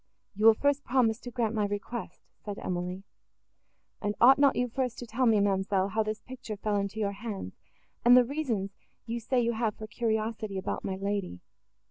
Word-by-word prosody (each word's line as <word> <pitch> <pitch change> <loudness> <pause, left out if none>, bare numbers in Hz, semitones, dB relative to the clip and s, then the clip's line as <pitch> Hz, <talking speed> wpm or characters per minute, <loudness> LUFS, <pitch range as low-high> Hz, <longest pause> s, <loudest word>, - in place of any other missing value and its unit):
"You 210 +2 +3
will 225 - +8
first 285 +3 +1
promise 240 -4 +2
to 245 - -8
grant 235 -3 -1
my 210 -2 +1
request," 205 +3 -5 0.2
said 205 -1 -5
Emily. 180 +1 -4 1.0
"And 205 0 -1
ought 265 +3 +7
not 280 -1 +5
you 250 - +1
first 250 0 -2
to 245 - -6
tell 240 +3 0
me, 220 -2 +5
ma'amselle, 195 -1 +1
how 220 +2 0
this 215 0 -3
picture 255 -5 -7
fell 210 +1 -1
into 200 +2 -2
your 205 -2 0
hands, 200 - -6 0.5
and 245 +1 +8
the 250 - +6
reasons 235 -8 -2 0.3
you 235 +1 -3
say 245 +3 0
you 235 -1 +2
have 220 -2 -1
for 215 - -7
curiosity 220 -2 -2
about 190 - -3
my 190 - -2
lady?" 195 - -3
220 Hz, 190 wpm, -29 LUFS, 200-240 Hz, 1.0 s, will